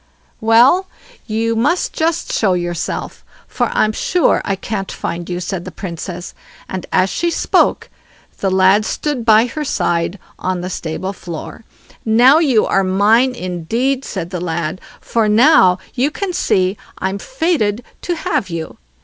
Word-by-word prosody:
"Well; 245 Hz, +12 st, +4 dB, 0.4 s
you 225 Hz, +1 st, 0 dB
must 290 Hz, +11 st, +1 dB
just 325 Hz, +1 st, -1 dB
show 195 Hz, -4 st, +2 dB
yourself, 175 Hz, -1 st, -3 dB, 0.2 s
for -, -, -1 dB
I'm 215 Hz, -, +2 dB
sure 350 Hz, +10 st, +1 dB
I 195 Hz, -, -1 dB
can't 195 Hz, 0 st, -4 dB
find 170 Hz, +1 st, -5 dB
you", 175 Hz, 0 st, -2 dB
said 180 Hz, 0 st, -4 dB
the -, -, -7 dB
Princess, 175 Hz, -1 st, -6 dB, 0.3 s
and 190 Hz, -1 st, -5 dB
as 185 Hz, +1 st, +2 dB
she 340 Hz, +12 st, 0 dB
spoke -, -, +1 dB, 0.5 s
the 195 Hz, -, 0 dB
lad 190 Hz, +2 st, +4 dB
stood 280 Hz, +2 st, -2 dB
by 220 Hz, 0 st, +5 dB
her 300 Hz, +5 st, -4 dB
side 175 Hz, -, -1 dB, 0.2 s
on 185 Hz, -1 st, -2 dB
the 180 Hz, +1 st, -5 dB
stable 180 Hz, +4 st, -4 dB
floor. 175 Hz, +5 st, -8 dB, 0.4 s
"Now 245 Hz, +7 st, +5 dB
you 265 Hz, -9 st, +3 dB
are 195 Hz, -, +2 dB
mine 215 Hz, +7 st, +3 dB
indeed", 230 Hz, +8 st, -2 dB
said 180 Hz, -7 st, -5 dB
the 180 Hz, -3 st, -4 dB
lad; 170 Hz, 0 st, -3 dB, 0.2 s
"for 225 Hz, -2 st, 0 dB
now 210 Hz, -, +5 dB, 0.2 s
you 260 Hz, +3 st, +1 dB
can 370 Hz, +4 st, -4 dB
see 190 Hz, -, +1 dB, 0.2 s
I'm 190 Hz, +1 st, -2 dB
fated 305 Hz, -, -1 dB, 0.2 s
to 350 Hz, -, -2 dB
have 310 Hz, -, -2 dB
you." 165 Hz, -1 st, -6 dB
210 Hz, 150 wpm, -17 LUFS, 185-255 Hz, 0.5 s, by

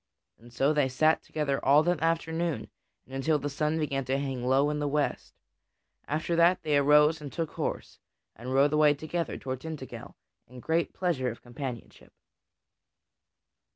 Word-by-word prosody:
And 120 Hz, +1 st, -16 dB
so 135 Hz, +5 st, +2 dB
they 145 Hz, -3 st, +2 dB
sat 155 Hz, +5 st, +2 dB
together 140 Hz, -3 st, -2 dB
all 145 Hz, +3 st, +5 dB
that 175 Hz, 0 st, 0 dB
afternoon 165 Hz, -5 st, -1 dB, 0.3 s
and 130 Hz, -, -15 dB
until 150 Hz, +4 st, +1 dB
the 145 Hz, 0 st, -4 dB
sun 150 Hz, +2 st, 0 dB
began 140 Hz, -3 st, -1 dB
to 130 Hz, +2 st, 0 dB
hang 135 Hz, -3 st, -3 dB
low 135 Hz, +3 st, +3 dB
in 150 Hz, -, -2 dB
the 145 Hz, -, -1 dB
west; 145 Hz, +1 st, -2 dB, 0.7 s
after 160 Hz, +3 st, -1 dB
that, 170 Hz, +2 st, +4 dB
they 150 Hz, -1 st, +1 dB
arose 150 Hz, +2 st, +4 dB
and 145 Hz, -2 st, -7 dB
took 165 Hz, -2 st, -3 dB
horse, -, -, -4 dB, 0.4 s
and 125 Hz, +3 st, -7 dB
rode 140 Hz, +3 st, +3 dB
away 150 Hz, -1 st, +5 dB
together 160 Hz, +2 st, -3 dB
toward 130 Hz, -1 st, -5 dB
Tintagel 135 Hz, -7 st, -8 dB, 0.3 s
in 125 Hz, +1 st, -12 dB
great 165 Hz, +5 st, 0 dB
pleasure 160 Hz, -9 st, 0 dB
of 115 Hz, -, -9 dB
companionship. 120 Hz, -1 st, -8 dB
145 Hz, 160 wpm, -28 LUFS, 135-160 Hz, 0.7 s, all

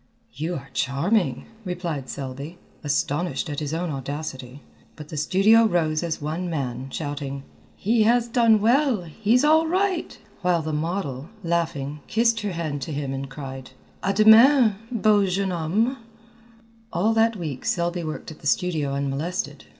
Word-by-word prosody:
"You 160 Hz, +7 st, -3 dB
are 135 Hz, -2 st, -8 dB
charming," 165 Hz, +10 st, 0 dB, 0.2 s
replied 175 Hz, -7 st, -4 dB
Selby, 140 Hz, +5 st, -6 dB, 0.3 s
astonished 150 Hz, +3 st, -1 dB
at 145 Hz, -, -3 dB
his 150 Hz, -2 st, -3 dB
own 165 Hz, +1 st, -2 dB
audacity, 135 Hz, -1 st, -6 dB, 0.3 s
but 150 Hz, -1 st, -10 dB
the -, -, -7 dB
studio 195 Hz, +9 st, +4 dB
rose 160 Hz, -6 st, +1 dB
as 170 Hz, -2 st, -2 dB
one 160 Hz, +4 st, -3 dB
man, 130 Hz, -4 st, -3 dB
shouting: 140 Hz, -2 st, -5 dB, 0.3 s
"He 225 Hz, +3 st, +1 dB
has 235 Hz, +2 st, +3 dB
done 230 Hz, -3 st, +4 dB
well! 245 Hz, -2 st, +3 dB
he's 220 Hz, -, +1 dB
all 315 Hz, +1 st, +5 dB
right!" 370 Hz, 0 st, 0 dB, 0.2 s
while 175 Hz, -3 st, +1 dB
the 155 Hz, 0 st, -3 dB
model, 150 Hz, -3 st, -3 dB
laughing, 155 Hz, -4 st, -1 dB
kissed 230 Hz, 0 st, +2 dB
her 205 Hz, -3 st, -3 dB
hand 155 Hz, -4 st, -3 dB
to 135 Hz, -, -5 dB
him 140 Hz, -2 st, -3 dB
and 135 Hz, 0 st, -5 dB
cried: 135 Hz, -2 st, -8 dB, 0.3 s
"À 195 Hz, -, +2 dB
demain 220 Hz, +4 st, +7 dB, 0.2 s
beau 215 Hz, -3 st, +3 dB
jeune 190 Hz, +1 st, 0 dB
homme!" 195 Hz, +10 st, 0 dB, 0.9 s
All 205 Hz, +7 st, +1 dB
that 225 Hz, 0 st, +3 dB
week 155 Hz, -9 st, -5 dB
Selby 175 Hz, 0 st, -1 dB
worked 155 Hz, 0 st, -6 dB
at 155 Hz, -, -12 dB
the -, -, -5 dB
studio 150 Hz, -4 st, 0 dB
unmolested. 145 Hz, +8 st, -3 dB
170 Hz, 150 wpm, -24 LUFS, 145-215 Hz, 0.9 s, demain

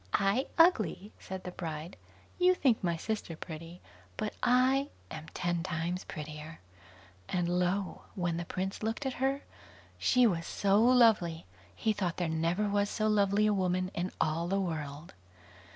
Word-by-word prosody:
"I 200 Hz, +7 st, +2 dB
ugly", 215 Hz, -, +3 dB
said 190 Hz, 0 st, -7 dB
the 180 Hz, -, -5 dB
bride; 165 Hz, -1 st, -6 dB, 0.4 s
"you 365 Hz, +1 st, +5 dB
think 255 Hz, -, +2 dB
my 170 Hz, -2 st, +1 dB
sister 210 Hz, -3 st, -3 dB
pretty, 165 Hz, +2 st, -8 dB, 0.4 s
but 215 Hz, -, -2 dB
I 260 Hz, +3 st, +3 dB, 0.2 s
am 160 Hz, 0 st, -7 dB
ten 175 Hz, -1 st, 0 dB
times 175 Hz, +1 st, -3 dB
prettier"; 155 Hz, 0 st, -7 dB, 0.7 s
and 175 Hz, -1 st, 0 dB
lo! 180 Hz, +2 st, 0 dB
when 175 Hz, -3 st, -1 dB
the 170 Hz, -, -2 dB
Prince 190 Hz, +3 st, -3 dB
looked 225 Hz, +5 st, -2 dB
at 265 Hz, -, -1 dB
her, 270 Hz, +1 st, +1 dB, 0.6 s
she 250 Hz, -1 st, +4 dB
was 170 Hz, -7 st, +1 dB
so 200 Hz, +1 st, +2 dB
lovely, 225 Hz, -10 st, +4 dB, 0.3 s
he 220 Hz, -, +1 dB
thought 185 Hz, -5 st, -2 dB
there 175 Hz, -, 0 dB
never 165 Hz, +6 st, 0 dB
was 205 Hz, 0 st, +1 dB
so 215 Hz, -1 st, 0 dB
lovely 205 Hz, 0 st, +3 dB
a 210 Hz, -, +3 dB
woman 185 Hz, -1 st, 0 dB
in 180 Hz, +2 st, -2 dB
all 160 Hz, +2 st, 0 dB
the 195 Hz, +2 st, +1 dB
world. 155 Hz, -4 st, -4 dB
185 Hz, 155 wpm, -31 LUFS, 170-215 Hz, 0.7 s, you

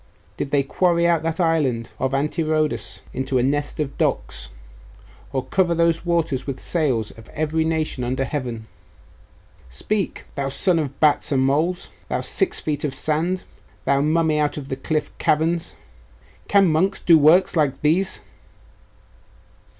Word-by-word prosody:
Did 140 Hz, -, -4 dB
they 140 Hz, -1 st, +2 dB
quarry 170 Hz, +4 st, +1 dB
out 170 Hz, -2 st, +3 dB
that 165 Hz, +2 st, -2 dB
island 145 Hz, -9 st, +1 dB
of 130 Hz, -, 0 dB
Antirrhodus 155 Hz, +1 st, -1 dB
into 130 Hz, 0 st, -1 dB
a 125 Hz, -, +2 dB
nest 145 Hz, +3 st, -1 dB
of 145 Hz, -2 st, -3 dB
docks, -, -, -1 dB, 0.8 s
or 135 Hz, -2 st, -2 dB
cover 175 Hz, -3 st, +1 dB
those 170 Hz, 0 st, +2 dB
waters 165 Hz, -7 st, 0 dB
with 135 Hz, -2 st, -3 dB
the -, -, -14 dB
sails 130 Hz, -10 st, 0 dB
of 115 Hz, -, -15 dB
every 155 Hz, +1 st, 0 dB
nation 160 Hz, -5 st, -1 dB
under 130 Hz, +2 st, -1 dB
heaven? 125 Hz, -6 st, -4 dB, 1.0 s
Speak! 195 Hz, -, -3 dB
Thou 140 Hz, -1 st, -2 dB
son 170 Hz, +5 st, +2 dB
of 140 Hz, -3 st, -4 dB
bats 150 Hz, -1 st, +3 dB
and 130 Hz, -2 st, +2 dB
moles 160 Hz, +7 st, 0 dB, 0.2 s
thou -, -, -1 dB
six 385 Hz, -, +1 dB
feet 150 Hz, -2 st, -3 dB
of 140 Hz, -3 st, -1 dB
sand 160 Hz, +6 st, 0 dB, 0.4 s
thou 140 Hz, 0 st, +2 dB
mummy 155 Hz, 0 st, +2 dB
out 150 Hz, 0 st, 0 dB
of 140 Hz, -2 st, -7 dB
the 130 Hz, -, -2 dB
cliff 150 Hz, +2 st, -2 dB
caverns! 160 Hz, +2 st, 0 dB, 0.7 s
Can 200 Hz, -1 st, +5 dB
monks 175 Hz, +5 st, +1 dB
do 170 Hz, -, +5 dB
works 170 Hz, +6 st, +5 dB
like 145 Hz, -4 st, +1 dB
these? 175 Hz, +6 st, +2 dB
150 Hz, 150 wpm, -22 LUFS, 135-165 Hz, 1.0 s, Can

